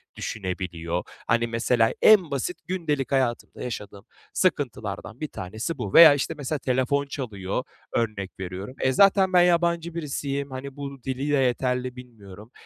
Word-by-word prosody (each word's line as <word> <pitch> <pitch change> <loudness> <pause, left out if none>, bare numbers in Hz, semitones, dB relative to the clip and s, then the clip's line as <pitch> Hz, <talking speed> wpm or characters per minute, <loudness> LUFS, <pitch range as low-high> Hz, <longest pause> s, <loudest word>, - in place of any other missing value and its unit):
düşünebiliyor. 90 -4 -4 0.2
Hani, 115 +1 +2
mesela, 115 0 +2
en 190 -8 +6
basit 140 +6 -2
gündelik 150 -7 -2
hayatımda 130 -3 -1
yaşadığım 105 -4 -7 0.3
sıkıntılardan 115 - -2
bir 155 - -3
tanesi 110 - -5
bu. 105 -6 -5
Veya, 165 -3 +10
işte, 145 - -2
mesela, 145 +1 -3
telefon 130 +2 0
çalıyor, 110 -6 -4 0.3
örnek 105 -5 -2
veriyorum. 95 +6 -6
E, 130 - +3
zaten 195 0 +5
ben 180 - +7
yabancı 170 -1 +2
birisiyim. 140 -3 -3
Hani, 130 +1 -7
bu 140 -3 -7
dili 135 +2 -2
de - - +4
yeterli 125 0 0
bilmiyorum. 110 -4 -13
130 Hz, 140 wpm, -25 LUFS, 110-145 Hz, 0.3 s, Veya